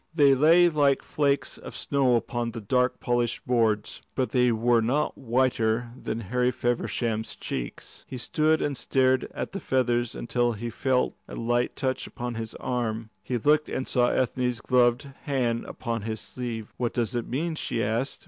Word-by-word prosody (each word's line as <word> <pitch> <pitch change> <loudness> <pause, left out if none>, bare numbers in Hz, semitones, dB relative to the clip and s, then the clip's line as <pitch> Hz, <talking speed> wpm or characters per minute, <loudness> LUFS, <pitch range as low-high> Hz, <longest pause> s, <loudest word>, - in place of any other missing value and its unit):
They 140 -4 +6
lay 165 +6 +6
like 145 -4 +2
flakes 145 -2 0
of - - -9
snow 135 -3 +2
upon 120 0 -1
the 115 - -5
dark 125 +4 +1
polished 120 -1 -1
boards. 110 -4 +1
But 130 -2 0
they 125 -2 +3
were 115 +1 +3
not 130 +7 0
whiter 120 -2 +1
than 115 -3 -4
Harry 125 +4 +1
Feversham's 120 -2 -1
cheeks. - - -6
He 130 - -6
stood 155 +5 +1
and 145 -1 -1
stared 130 0 +2
at - - -5
the 195 - -4
feathers 120 - 0
until 120 0 0
he 115 +2 -5
felt 130 +2 +1
a - - -8
light 120 +1 0
touch 130 -1 -2
upon 120 0 -5
his 115 -1 -5
arm. 115 -3 -3
He 120 +5 -2
looked 150 +5 +3
and 130 - -3
saw 120 -1 +3
Ethne's 125 -1 0
gloved 125 +1 +3 0.2
hand 125 -5 0
upon 115 -3 -4
his 110 +1 -4
sleeve. 115 -4 -6
"What 120 -2 -1
does 120 -1 0
it 120 -1 -2
mean?" 160 +7 -1
she 115 -7 -2
asked. 115 +6 -1
120 Hz, 170 wpm, -26 LUFS, 115-130 Hz, 0.2 s, They